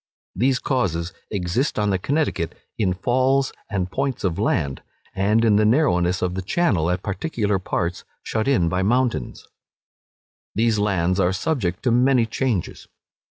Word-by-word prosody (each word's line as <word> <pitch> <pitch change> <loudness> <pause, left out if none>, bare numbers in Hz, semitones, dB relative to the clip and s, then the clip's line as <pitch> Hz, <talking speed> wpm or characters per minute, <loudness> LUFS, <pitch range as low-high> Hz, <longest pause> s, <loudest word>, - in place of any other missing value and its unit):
These 130 +6 +2
causes 90 - -1 0.2
exist 100 +8 -1
on 105 -1 +1
the 95 - 0
Connecticut 140 - -1 0.2
in 95 -5 0
falls 130 +6 +1 0.2
and 95 -4 -2
points 135 +1 -2
of 90 -4 -1
land, 70 -2 0 0.3
and 105 +4 +2
in 105 -2 +4
the 110 - +3
narrowness 95 - +2
of 90 -1 0
the 95 - -3
channel 95 - +1
at 90 +1 -1
particular 105 -2 -1
parts 90 -1 -2 0.2
shut 110 +3 -2
in 125 -12 +3
by 90 +2 0
mountains. 120 - 0 1.1
These 110 -1 +2
lands 95 -3 +1
are 90 -1 +3
subject 95 - -2
to 125 - +2
many 125 0 +4
changes. 115 -5 -2
105 Hz, 150 wpm, -22 LUFS, 90-125 Hz, 1.1 s, in